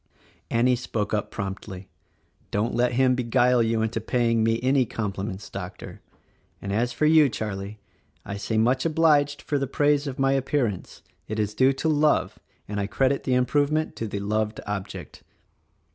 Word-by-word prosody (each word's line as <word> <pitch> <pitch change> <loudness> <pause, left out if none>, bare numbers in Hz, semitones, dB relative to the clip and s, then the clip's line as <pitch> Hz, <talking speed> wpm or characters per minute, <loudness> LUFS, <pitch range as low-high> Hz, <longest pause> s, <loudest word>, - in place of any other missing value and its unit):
Annie 125 +2 +3
spoke 110 -4 -3
up 105 - -1
promptly, 95 -1 -6 0.6
"Don't 105 +4 -1
let 125 0 +1
him 130 +1 +3
beguile 125 0 +2
you 115 -1 +1
into 110 0 -2
paying 115 0 +1
me 115 +1 +2
any 130 +1 +3
compliments, 100 -3 -4
Doctor. - - -8 0.6
And 100 0 -4
as 120 +4 +1
for 135 +6 0
you, 155 -2 +6
Charlie, 105 -2 -5 0.5
I 100 - -5
say 100 +2 -2
much 125 +4 +2
obliged 150 -3 +2
for 145 -2 -1
the 135 - -1
praise 145 +1 +1
of 130 - -5
my 135 0 +2
appear 135 0 +1
ance. 100 -5 -6 0.2
It 110 - -4
is 105 -1 -1
due 130 +5 +4
to 135 +4 -3
love 150 -1 +2
— - - -40
and 105 0 -3
I 100 - -1
credit 135 +5 0
the 130 - +2
improvement 145 +5 +1
to 115 - -3
the 100 -1 -4
loved 105 +1 -1
object." 105 -2 -6
120 Hz, 175 wpm, -25 LUFS, 105-135 Hz, 0.6 s, you